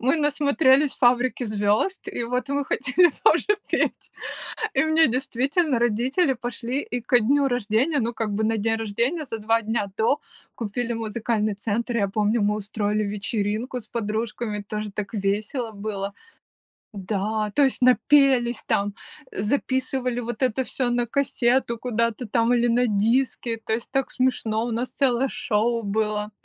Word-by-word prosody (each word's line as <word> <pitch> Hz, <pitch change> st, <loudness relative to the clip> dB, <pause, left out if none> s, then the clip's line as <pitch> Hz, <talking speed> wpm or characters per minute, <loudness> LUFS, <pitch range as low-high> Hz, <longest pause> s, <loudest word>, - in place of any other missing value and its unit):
Мы 265 Hz, +7 st, +2 dB
насмотрелись 290 Hz, -2 st, +3 dB
"Фабрики 245 Hz, 0 st, +2 dB
Звёзд", 210 Hz, -, 0 dB
и 240 Hz, -, -3 dB
вот 250 Hz, +2 st, -2 dB
мы 285 Hz, 0 st, 0 dB
хотели 310 Hz, +8 st, +3 dB, 0.2 s
тоже -, -, +4 dB, 0.2 s
петь. -, -, -1 dB, 0.6 s
И -, -, +3 dB
мне 315 Hz, 0 st, +4 dB
действительно 265 Hz, +3 st, 0 dB
родители 250 Hz, -, +1 dB
пошли 245 Hz, +2 st, -3 dB
и 245 Hz, -3 st, -4 dB
ко 245 Hz, +1 st, +3 dB
дню 275 Hz, +5 st, +2 dB
рождения, 245 Hz, +5 st, +1 dB
ну, 235 Hz, 0 st, -1 dB
как 220 Hz, -2 st, -3 dB
бы 215 Hz, +2 st, -1 dB
на 225 Hz, +1 st, +1 dB
день 225 Hz, +1 st, +1 dB
рождения, 235 Hz, +9 st, -1 dB
за 225 Hz, -, -5 dB
2 225 Hz, +2 st, +2 dB
дня 215 Hz, -1 st, -1 dB
до, 230 Hz, +7 st, +2 dB, 0.4 s
купили 235 Hz, +2 st, -3 dB
музыкальный 220 Hz, -1 st, -1 dB
центр. 230 Hz, +4 st, -2 dB
Я 200 Hz, -3 st, +2 dB
помню, 210 Hz, +3 st, +1 dB
мы 205 Hz, +1 st, +2 dB
устроили 210 Hz, 0 st, -1 dB
вечеринку 210 Hz, +4 st, -2 dB
с 220 Hz, -, -13 dB
подружками, 215 Hz, -1 st, -3 dB
тоже 210 Hz, -1 st, -4 dB
так 200 Hz, +1 st, -5 dB
весело 215 Hz, +4 st, -1 dB
было. 200 Hz, -1 st, -4 dB, 0.8 s
Да, 210 Hz, +2 st, -2 dB
то 290 Hz, -, +4 dB
есть 265 Hz, -1 st, 0 dB
напелись 255 Hz, -2 st, +4 dB
там, 200 Hz, 0 st, 0 dB, 0.4 s
э, -, -, -4 dB
записывали 260 Hz, +1 st, -1 dB
вот 240 Hz, +1 st, -5 dB
это 260 Hz, +1 st, +1 dB
всё 255 Hz, 0 st, -1 dB
на 240 Hz, 0 st, +1 dB
кассету 255 Hz, -2 st, +1 dB
куда-то 230 Hz, 0 st, -1 dB
там 230 Hz, +2 st, +2 dB
или 240 Hz, 0 st, +2 dB
на 245 Hz, +2 st, +3 dB
диски, 230 Hz, +2 st, 0 dB
то -, -, -1 dB
есть 230 Hz, -, -5 dB
так 270 Hz, -1 st, 0 dB
смешно, 230 Hz, -4 st, 0 dB
у 240 Hz, -, -3 dB
нас 240 Hz, +3 st, -1 dB
целое 260 Hz, -1 st, +1 dB
шоу 230 Hz, +1 st, 0 dB
было, 210 Hz, 0 st, -1 dB
235 Hz, 155 wpm, -24 LUFS, 215-255 Hz, 0.8 s, тоже